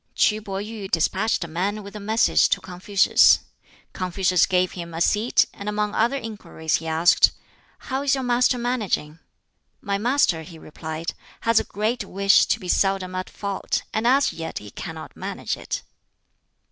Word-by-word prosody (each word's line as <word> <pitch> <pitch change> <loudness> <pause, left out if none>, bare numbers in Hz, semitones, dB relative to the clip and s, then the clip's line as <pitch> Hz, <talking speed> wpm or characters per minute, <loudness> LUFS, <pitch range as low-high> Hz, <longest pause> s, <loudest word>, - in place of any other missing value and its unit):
KŁ 215 0 +2
Pih 195 -1 -5
yuh 215 -3 -7
despatched 190 +5 +1
a - - -6
man 195 +6 -2
with 200 +1 -11
a - - -5
message 220 +2 +3
to 200 - +1
Confucius. 190 +2 +4 0.5
Confucius 185 -1 +1
gave 185 -1 +1
him 170 -2 -7
a - - -3
seat, 210 +7 +3
and 200 +1 -6
among 210 0 -1
other 235 +5 +2
inquiries 210 - -3
he 165 - -8
asked, 160 +2 +4 0.4
"How 265 +1 -4
is 280 -1 +2
your 265 - -3
master 245 0 +2
managing?" 215 -11 -2 0.6
"My 200 -1 -2
master," 240 - +2
he 165 +1 -11
replied, 160 +1 -6 0.3
"has 230 -1 +4
a - - -2
great 220 +4 -2
wish 195 +1 +3
to 225 - +1
be 185 - -8
seldom 190 0 +1
at 185 0 -4
fault, 200 -1 -3
and 220 +2 0
as 275 +3 +3
yet 165 -1 -6
he 105 -1 -8
cannot - - -8
manage - - -4
it." - - -5
200 Hz, 170 wpm, -23 LUFS, 180-220 Hz, 0.6 s, Confucius